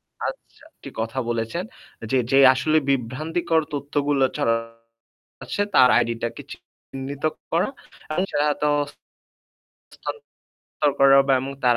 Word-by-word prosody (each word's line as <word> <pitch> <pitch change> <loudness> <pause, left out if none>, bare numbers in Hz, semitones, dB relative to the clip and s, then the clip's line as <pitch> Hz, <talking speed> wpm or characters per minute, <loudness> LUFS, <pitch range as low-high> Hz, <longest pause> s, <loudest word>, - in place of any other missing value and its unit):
আচ্ছা। - - -12
আচ্ছা, - - -10
একটি - - -12
কথা 115 +4 -3
বলেছেন 115 +9 -2 0.5
যে, 135 - +2 0.2
যে 135 - +6 0.2
আসলে 155 +5 +1
বিভ্রান্তিকর 155 +6 0
তথ্যগুলো 145 -1 0
ছড়াচ্ছে 115 +9 -4
তার 125 - +7
ID - - 0
টাকে 120 - -4
চিহ্নিত 135 +2 -9 0.3
করা। 170 +2 +1 0.5
আচ্ছা 185 0 -1 0.2
তো - - +3 1.2
হস্থান্তর 460 - -9 0.6
করা 135 0 +7
বা 135 - +3
এবং 135 +1 -5
তার 120 -1 +5
135 Hz, 115 wpm, -23 LUFS, 115-150 Hz, 1.2 s, তার